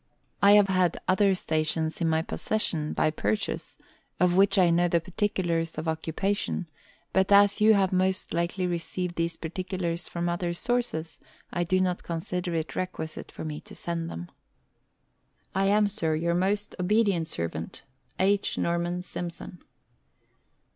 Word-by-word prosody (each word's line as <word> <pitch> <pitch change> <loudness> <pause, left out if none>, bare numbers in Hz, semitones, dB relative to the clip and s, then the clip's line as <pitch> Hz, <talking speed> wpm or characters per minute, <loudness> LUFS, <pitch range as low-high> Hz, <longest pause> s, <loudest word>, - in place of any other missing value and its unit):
I 200 0 +7
have 205 -1 +6
had 185 -3 +1
other 195 +1 +4
stations 160 +1 -1
in 165 - +2
my 160 0 +2
possession, 165 -6 0
by 155 - +1
purchase, 105 -7 -2 0.4
of 180 0 +3
which 195 +1 +4
I 180 -3 +5
know 175 +1 +3
the 170 0 +2
particulars 175 -3 -1
of 160 +1 -4
occupation; 165 +5 -1 0.5
but 190 +1 +2
as 200 +1 +6
you 215 0 +7
have 190 -2 +2
most 185 0 +1
likely 170 +2 -1
received 175 +1 -3
these 165 0 -1
particulars 175 0 -3
from 170 0 -3
other 175 0 -1
sources, 235 -8 -2 0.3
I 175 - +1
do 185 +2 +1
not 180 -1 0
consider 175 +1 -3
it 160 -1 -3
requisite 180 -4 -5
for - - -7
me 150 -1 -5
to - - -12
send 170 -1 -3
them. 85 +1 -7 1.2
I 195 0 +2
am, 205 +1 +4
Sir, 165 -6 0
your 170 +2 0
most 200 +4 0
obedient 195 -3 +2
servant, 85 - -4 0.3
H. 200 +1 +1
NORMAN 175 +1 -1
SIMSON. 175 0 -7
175 Hz, 145 wpm, -27 LUFS, 165-190 Hz, 1.2 s, I